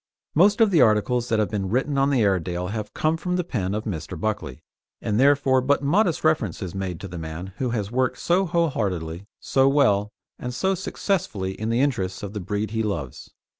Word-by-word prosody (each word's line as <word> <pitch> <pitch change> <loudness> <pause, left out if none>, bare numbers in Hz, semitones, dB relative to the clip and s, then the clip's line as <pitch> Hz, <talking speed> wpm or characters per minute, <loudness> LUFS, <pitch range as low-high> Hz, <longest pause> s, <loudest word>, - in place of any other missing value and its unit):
Most 200 +7 +4
of 220 -2 +5
the 165 -6 +5
articles 120 +2 +2
that 110 - +2
have 105 -1 0
been 100 -3 -2
written 135 +6 0
on 135 0 +3
the 130 -5 +2
Airedale 90 -2 0
have 105 0 -4
come 155 +1 0
from 180 +2 -2
the 180 - 0
pen 100 - -2
of 110 - -2
Mr. 80 -9 -5
Buckley, 80 -10 -3 0.4
and 105 +1 -1
therefore 135 -1 +4
but 140 +2 +1
modest 175 +4 +2
reference 150 - +1
is 90 -3 -5
made 95 -3 -4
to 100 - -6
the 85 -2 -7
man 80 +4 -6
who 130 - 0
has 105 -3 -2
worked 130 0 0
so 185 +2 +1
whole 170 -1 +2
heartedly, 90 - -3
so 135 0 +3
well, 105 -8 +3 0.3
and 125 0 -5
so 190 +5 +1
successfully 170 - -2
in 110 +3 -4
the 115 +2 +2
interests 95 -11 -1
of 100 0 -5
the 105 - -3
breed 105 +3 -3
he 110 0 -1
loves. 85 - -4
110 Hz, 210 wpm, -24 LUFS, 95-140 Hz, 0.4 s, of